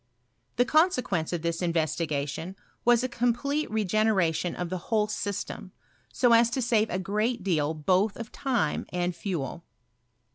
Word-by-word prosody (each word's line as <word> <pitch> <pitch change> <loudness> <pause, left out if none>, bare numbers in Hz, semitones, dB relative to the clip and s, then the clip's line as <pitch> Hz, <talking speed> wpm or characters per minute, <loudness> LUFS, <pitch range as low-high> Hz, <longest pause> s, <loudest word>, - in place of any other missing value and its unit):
The 245 - +3
consequence 255 - +2
of 170 -2 -3
this 170 +1 -1
investigation 160 0 -1 0.3
was 240 0 +4
a - - +1
complete 250 +5 0
regeneration 200 -5 +1
of 175 -1 -4
the 185 - -2
whole 215 -2 +3
syatero, 205 -1 -4 0.4
so 245 -2 +3
as 230 0 +6
to 260 - -2
save 225 -2 +2
a 180 - -1
great 210 +4 -1
deal 160 -5 0
both 185 +7 +1
of 230 -1 -7
time 240 - -1
and 180 0 -1
fiiel. 170 -4 -4
200 Hz, 145 wpm, -27 LUFS, 170-235 Hz, 0.4 s, as